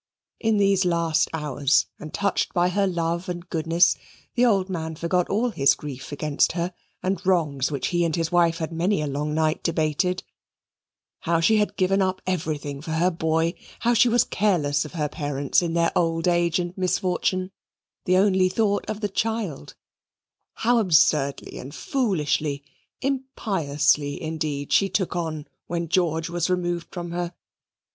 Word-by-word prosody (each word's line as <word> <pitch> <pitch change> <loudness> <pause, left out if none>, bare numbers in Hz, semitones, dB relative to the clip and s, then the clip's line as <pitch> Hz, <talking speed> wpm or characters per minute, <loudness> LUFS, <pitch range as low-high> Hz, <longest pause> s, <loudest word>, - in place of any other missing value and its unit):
In 220 -1 +2
these 195 -1 +3
last 170 -2 +1
hours, 145 -2 +1
and 155 - -8
touched 200 -1 -1
by 175 0 +3
her 195 +2 +1
love 170 0 -2
and 175 0 -5
goodness, 165 +1 +3 0.4
the 245 - +2
old 200 -6 +3
man 160 -4 -4
forgot 170 +2 0
all 230 +4 +1
his 140 -8 +3
grief 135 -2 -8
against 145 0 +1
her, 175 +1 -2 0.3
and 185 -1 -1
wrongs 155 -8 +1
which 140 -3 -2
he 175 -1 +1
and 165 -2 0
his 165 -1 -1
wife 170 -2 +3
had 165 -1 -4
many 170 +1 0
a - - -1
long 150 +2 -2
night 155 0 +1
debated: 170 +2 0 1.0
how 170 0 +1
she 215 +7 +4
had 210 -1 0
given 195 +1 +2
up 185 0 0
everything 150 -6 -3
for 160 +1 -5
her 175 +3 +2
boy; 165 0 0 0.3
how 240 +1 +3
she 240 +1 +5
was 240 0 +4
careless 160 -8 +1
of 150 - -10
her 150 -4 -1
parents 145 0 0
in 170 -1 -2
their 170 0 +1
old 165 0 +1
age 175 -1 +2
and 175 0 -3
misfortune, 185 0 0 0.6
and 185 - +4
only 190 -1 +4
thought 205 +1 0
of 215 0 -4
the 205 - +1
child; 205 - -3 0.8
how 240 +1 +2
absurdly 155 -7 +2
and 135 +3 -9
foolishly, 155 - -1 0.4
impiously 160 - 0
indeed, 155 -4 -3
she 195 - +4
took 185 -1 -1
on 160 -3 -3 0.2
when 170 -1 -2
George 165 -2 +1
was 170 0 -1
removed 175 -2 -1
from 175 -2 -6
her. 175 0 -3
170 Hz, 165 wpm, -24 LUFS, 155-185 Hz, 1.0 s, she